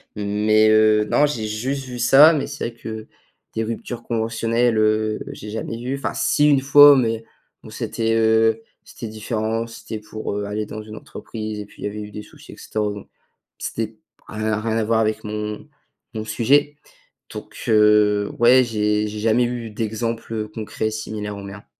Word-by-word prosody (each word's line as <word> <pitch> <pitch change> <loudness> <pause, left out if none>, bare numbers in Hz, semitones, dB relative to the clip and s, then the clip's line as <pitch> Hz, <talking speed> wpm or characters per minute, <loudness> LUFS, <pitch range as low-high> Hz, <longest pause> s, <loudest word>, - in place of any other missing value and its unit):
Mais, 105 +1 +2
heu, 110 0 +4
non 150 - +4
j'ai 120 -7 -3
juste 130 +6 -3
vu 125 -1 -7
ça 140 +7 +7
mais 145 - -1
c'est 145 -4 -4
vrai 115 - -17
que 110 -1 -7 0.5
des 115 - -1
ruptures 115 +1 -5
conventionnelles, 115 0 0
heu, 110 0 +1
j'ai 105 - -9
jamais 110 +1 -4
vu, 125 +3 -3
enfin, - - -3
si, 150 0 +2
1 140 -2 +5
fois, 145 +1 +8
mais 115 -2 0 0.4
bon, - - -11
c'était, 115 0 -2
heu, 110 0 +3 0.2
c'était 115 - -9
différent, 110 +1 -2
c'était 110 -1 -8
pour, 105 -1 -6
heu, 105 - -2
aller 105 +1 -3
dans 110 +1 -7
une 110 0 -10
entreprise 110 -2 -7
et - - -8
puis - - -18
il - - -2
y - - 0
avait 105 +1 -6
eu 105 0 -8
des 105 +1 -7
soucis - - -15
et - - -13
cetera, 110 -1 -3
bon. 105 -1 -8 0.5
C'était 110 -1 -4 0.3
rien 110 0 -2
rien 110 0 -2
à 115 - +1
voir 110 +1 +1
avec 110 0 0
mon 105 0 -5 0.5
mon 110 -1 -5
sujet. 140 +7 +2 0.6
Donc, - - -9
heu, 105 -1 +4
ouais 125 +2 +6
j'ai 105 -2 0
j'ai 105 0 -6
jamais 115 +3 +2
eu 120 -2 -4
d'exemples, 115 +1 -3
heu, 110 -1 -3
concrets 110 0 -4
similaires 105 -1 -5
aux 100 - -8
miens. 100 +1 -10
110 Hz, 185 wpm, -21 LUFS, 105-115 Hz, 0.6 s, fois